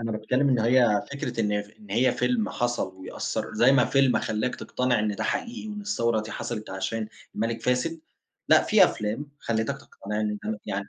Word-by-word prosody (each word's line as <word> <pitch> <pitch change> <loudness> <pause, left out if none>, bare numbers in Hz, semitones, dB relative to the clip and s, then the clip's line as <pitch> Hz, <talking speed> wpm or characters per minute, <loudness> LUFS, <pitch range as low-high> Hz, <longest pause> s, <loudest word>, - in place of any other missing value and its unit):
أنا 115 -1 -2
باتكلّم 125 +6 +1
إن 125 - +3
هي 115 -2 +4
فكرة، 140 -4 -3
إن 105 -1 +1
ف 105 - -17
إن 105 -2 -16
هي 120 +5 +3
فيلم 125 -3 +1
حصَل 120 -6 -1
ويأثّر، 95 - -4
زي 120 +5 +5
ما 125 -3 +5
فيلم 135 0 +3
خلّاك 110 +4 -1
تقتنع 125 -2 0
إن 105 -1 0
ده - - -2
حقيقي 235 -2 -3
وإن 210 0 -5
الثورة 115 - 0
دي 110 0 -7
حصلت 110 0 -5
عشان 105 +4 -3 0.3
المَلِك 115 +1 -2
فاسد، 140 +7 0 0.5
لأ، - - +7
في - - +6
أفلام 110 +8 -2
خلِّتك 110 -1 -1
تقتنع 105 +2 -5
إن 105 -1 -1
ده 110 -1 -3
يعني 100 +1 -3
115 Hz, 195 wpm, -26 LUFS, 105-125 Hz, 0.5 s, لأ